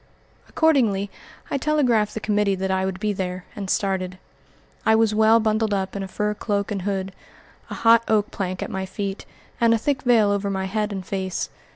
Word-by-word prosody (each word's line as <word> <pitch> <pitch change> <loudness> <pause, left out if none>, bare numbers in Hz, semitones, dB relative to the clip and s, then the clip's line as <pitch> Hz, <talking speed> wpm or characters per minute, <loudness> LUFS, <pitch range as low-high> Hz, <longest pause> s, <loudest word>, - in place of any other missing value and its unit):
Accordingly 225 -11 +2 0.4
I 280 - 0
telegraphed 255 -8 +2
the - - -2
committee 210 -2 +1
that 190 0 -2
I 190 0 +1
would 190 -1 -3
be 210 0 0
there, 185 -1 -4
and 195 -2 -5
started. 185 -2 -1 0.7
I 220 - +4
was 220 -1 +3
well 220 +1 +5
bundled 215 -1 +1
up 190 0 -3
in 200 - -3
a 195 - -4
fur 210 +2 -1
cloak 205 -1 -2
and 200 -2 -2
hood, 190 0 -2 0.6
a - - -5
hot 230 0 +5
oak 215 -1 +2
plank 185 -2 -3
at - - -6
my 190 0 -3
feet, 195 0 -5 0.3
and 230 -1 +5
a - - +2
thick 280 +5 -1
veil 230 -6 +4
over 200 0 0
my 190 -1 -2
head 210 +2 -1
and 190 -2 -5
face. 190 -1 -3
205 Hz, 200 wpm, -23 LUFS, 190-220 Hz, 0.7 s, well